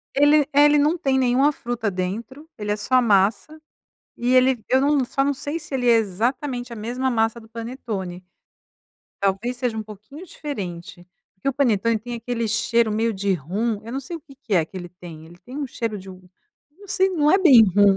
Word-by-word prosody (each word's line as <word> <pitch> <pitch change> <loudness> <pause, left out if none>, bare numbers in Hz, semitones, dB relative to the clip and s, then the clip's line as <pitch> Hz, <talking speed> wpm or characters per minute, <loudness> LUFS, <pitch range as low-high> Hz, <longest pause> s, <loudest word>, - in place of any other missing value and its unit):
Ele 290 +1 +5
é 290 +1 +6
ele 295 0 +5
não 300 +4 +2
tem 270 -5 +1
nenhuma 260 +3 +3
fruta 240 -5 -3
dentro, 220 +11 -5
ele 210 -1 -2
é - - -1
só 215 +5 -2
a 255 - +5
massa 215 +8 +1 0.6
e 245 +1 +1
ele 255 -2 +4
eu 260 - +3
não 280 -1 +2
só 275 +2 -1
não 285 - +1
sei 290 +3 -4
se 295 - -8
ele 250 -2 +1
é 235 - +6
exatamente 245 +5 -2
a - - -7
mesma 245 +5 -2
massa 225 0 0
do 220 - -16
panetone, 225 -6 -6 1.0
talvez 200 +6 -1
seja 245 -3 -2
um 220 - -2
pouquinho 215 - -12
diferente. 185 - -7 0.3
Porque 195 +8 -4
o - - +1
panetone 230 -4 +1
tem 240 +3 -7
aquele 235 0 -3
cheiro 230 0 +1
meio 225 +1 0
de 200 0 -1
rum, 200 - -2
eu 230 - -8
não 270 - -2
sei 335 +6 -7
o - - -11
que 275 - -17
que 250 -7 -3
é 170 -3 +3
que 175 - -13
ele 175 -1 -6
tem, 170 -3 -12
ele 175 +2 -16
tem 250 +8 -11
um 290 - -2
cheiro 230 -4 -4
de 190 - -12
um 185 -1 -13 0.5
não 405 - -14
sei 380 +1 +2
não 300 -5 +2
é 380 - +6
bem 275 - +8
rum. 200 0 +4
235 Hz, 215 wpm, -22 LUFS, 205-270 Hz, 1.0 s, bem